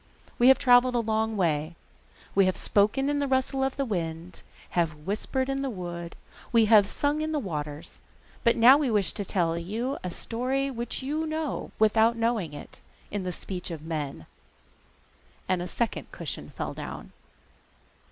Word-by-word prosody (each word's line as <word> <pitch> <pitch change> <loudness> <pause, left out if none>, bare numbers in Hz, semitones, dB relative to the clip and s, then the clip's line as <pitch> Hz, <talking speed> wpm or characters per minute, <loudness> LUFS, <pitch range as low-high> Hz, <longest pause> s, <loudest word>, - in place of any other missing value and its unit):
We 240 - +6
have 265 - +8
travelled 245 0 +5
a - - +3
long 220 -1 0
way, 160 -2 0 0.6
we 195 -1 +4
have 185 - 0
spoken 210 +7 +2
in 290 0 +1
the 285 - 0
rustle 265 0 +1
of 265 0 -1
the 275 - 0
wind, 170 -4 -4 0.3
have 165 -3 +1
whispered 210 - -2
in 270 0 -1
the 275 - -1
wood, 175 -5 -6 0.4
we 230 -2 +5
have 210 -2 +6
sung 290 +6 0
in 315 0 -2
the - - +1
waters, 150 - -5 0.4
but 235 - +4
now 250 +5 +8
we 285 -4 +1
wish 205 -6 +2
to 205 - -3
tell 170 -4 0
you 225 +10 -3
a 180 - -2
story 255 +8 -2
which 240 +1 -4
you 305 +4 -2
know 315 -1 -3
without 220 +2 +4
knowing 230 -8 0
it, 145 - -11 0.3
in 200 -2 -3
the 180 - -1
speech 180 +1 -5
of 160 -3 -6
men.' 150 - -4 1.2
And 185 -1 +1
a 175 - -4
second 230 +6 -3
cushion - - -5
fell - - -5
down. - - -8
220 Hz, 170 wpm, -27 LUFS, 175-260 Hz, 1.2 s, have